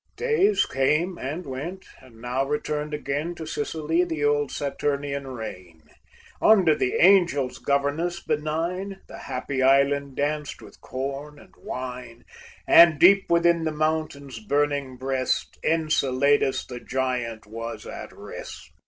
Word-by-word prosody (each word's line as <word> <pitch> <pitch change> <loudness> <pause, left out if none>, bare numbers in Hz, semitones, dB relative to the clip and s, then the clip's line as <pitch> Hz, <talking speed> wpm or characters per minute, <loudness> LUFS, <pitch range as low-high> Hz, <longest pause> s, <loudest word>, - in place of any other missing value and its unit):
Days 435 -4 +2
came 155 +7 0
and 155 +7 -4
went; 155 +9 -6 0.2
and 125 -4 -17
now 125 +3 -1
returned 150 +1 -2
again 150 +3 -3
To 160 - -7
Sicily 160 +2 -1
the 160 -4 -2
old 145 -1 +1
Saturnian 140 0 -2
reign; 90 -10 -8 0.6
Under 190 -7 +6
the 125 - -1
Angel's 170 -9 +4
governance 145 +5 0
benign 170 +6 -3
The - - -10
happy 130 +1 -3
island 140 +1 +3
danced 150 +1 -2
with - - -15
corn 140 +3 -5
and - - -17
wine, 125 -2 -7 0.4
And 170 -2 +8
deep 195 +4 +6
within 170 0 +3
the 160 - 0
mountain's 155 -4 -2
burning 140 +2 -1
breast 130 0 -2
Enceladus, 145 -4 +2
the 125 -1 -8
giant, 125 -4 -3
was 115 +2 -7
at - - -8
rest. 65 0 -10
145 Hz, 125 wpm, -25 LUFS, 130-160 Hz, 0.6 s, And